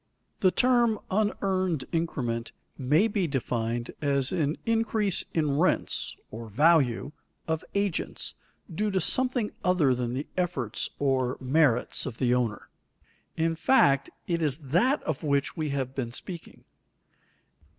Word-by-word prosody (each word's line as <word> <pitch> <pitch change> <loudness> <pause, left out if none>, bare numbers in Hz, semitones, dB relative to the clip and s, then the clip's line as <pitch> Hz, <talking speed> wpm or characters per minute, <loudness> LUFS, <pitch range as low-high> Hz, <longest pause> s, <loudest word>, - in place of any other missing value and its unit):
_ - - -39
The 185 - +5
term 240 0 +3
unearned 190 -7 0
increment 125 -9 -2 0.2
may 150 - +3
be 200 -5 0
defined 120 -4 -2
as 140 -3 +1
an 155 -4 0
increase 225 -3 +2
in 150 -3 +1
rents 185 - 0 0.2
(or 115 0 -8
value) 140 0 +3 0.4
of 160 -1 -1
agents, 200 -4 -1 0.4
due 210 +6 0
to 190 -2 +1
something 250 -1 +1
other 175 -8 +3
than 125 0 -2
the 140 +3 -3
efforts 165 - -1
or 130 -3 0
merits 130 -2 +2
of 120 -3 -6
the 125 -2 +2
owner; 120 -4 -1 0.7
in 165 0 +1
fact, 145 - +3 0.2
it 170 -1 -1
is 145 -4 0
that 175 - +1
of 155 -4 -3
which 140 -2 0
we 155 -2 -2
have 135 -2 -2
been 120 -3 -4
speaking. 170 +5 -8
155 Hz, 135 wpm, -27 LUFS, 130-185 Hz, 0.7 s, The